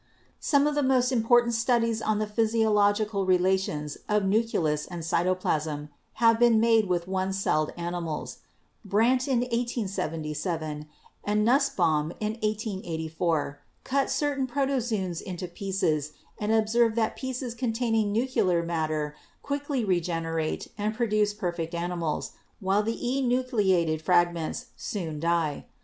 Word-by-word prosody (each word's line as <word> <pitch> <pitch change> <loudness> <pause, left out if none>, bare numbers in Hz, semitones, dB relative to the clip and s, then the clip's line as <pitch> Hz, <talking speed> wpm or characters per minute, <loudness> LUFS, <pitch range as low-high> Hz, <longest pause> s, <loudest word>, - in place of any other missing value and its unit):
Some 285 -1 +3
of 300 - +1
the 290 - +1
most 260 -2 +3
important 240 0 +3
studies 230 -1 +1
on 215 -1 +1
the 215 - 0
physiological 210 -2 +2
relations 180 -5 +1
of 210 -1 +2
nucleus 190 -8 +1
and 175 -2 -6
cytoplasm 160 -4 0 0.2
have 230 -1 +4
been 240 -2 +5
made 225 -2 +4
with 175 -1 0
one 190 0 -1
celled 155 -5 0
animals. 170 -2 -4 0.4
Brandt 230 +6 +2
in 255 -3 +2
1877 165 - -3 0.4
and 210 +1 +1
Nussbaum 175 - +2
in 215 0 -1
1884 170 -8 -2 0.2
cut 275 +1 0
certain 280 -3 0
protozoons 240 -9 -1
into 180 -1 -5
pieces 175 -5 -1 0.3
and 210 +1 -1
observed 225 +1 +3
that 225 -2 0
pieces 260 -2 -4
containing 225 -3 0
nuclear 205 -7 +1
matter 155 -3 -2 0.3
quickly 285 -3 -2
regenerate 165 -3 -1
and 210 +1 -1
produce 215 -3 +1
perfect 175 -5 -3
animals, 170 -2 -2 0.3
while 195 +1 +2
the 225 +2 -2
enucleated 240 - +1
fragments 175 -2 +1
soon 165 -7 -4
die. 165 -2 0
205 Hz, 120 wpm, -27 LUFS, 170-235 Hz, 0.4 s, been